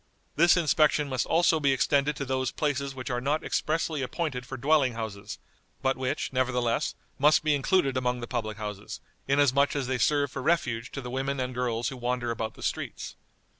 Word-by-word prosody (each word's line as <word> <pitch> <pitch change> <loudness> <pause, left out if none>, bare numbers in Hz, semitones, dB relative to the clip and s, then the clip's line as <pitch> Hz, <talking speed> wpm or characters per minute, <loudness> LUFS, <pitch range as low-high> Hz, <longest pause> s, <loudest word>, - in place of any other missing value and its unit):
This 170 +3 +5
inspection 155 -2 +3
must 130 -2 -1
also 165 -1 +3
be 140 -2 +3
extended 140 +2 +2
to 140 - -4
those 130 -1 -1
places 140 -2 -2
which 125 -1 -5
are 120 0 -1
not 145 +4 0
expressly 155 -1 -1
appointed 130 -2 -3
for 135 - -6
dwelling 135 -1 +3
houses, 105 -2 -6 0.5
but 135 0 +2
which, 130 0 -3
nevertheless, 125 -2 0 0.2
must 150 +3 +5
be 155 -1 +3
included 140 -1 +2
among 125 -1 0
the 120 - -5
public 110 -3 -3
houses, 105 -2 -6 0.3
inasmuch 140 0 +3
as 140 -2 -1
they 130 0 -1
serve 145 +2 +2
for - - -5
refuge 130 -6 0
to 135 - -4
the 125 -1 -7
women 135 +1 -2
and 125 0 -2
girls 120 -1 -1
who 135 - -8
wander 120 -1 -1
about 110 -1 -4
the - - -11
streets." - - -4
130 Hz, 190 wpm, -28 LUFS, 125-145 Hz, 0.5 s, This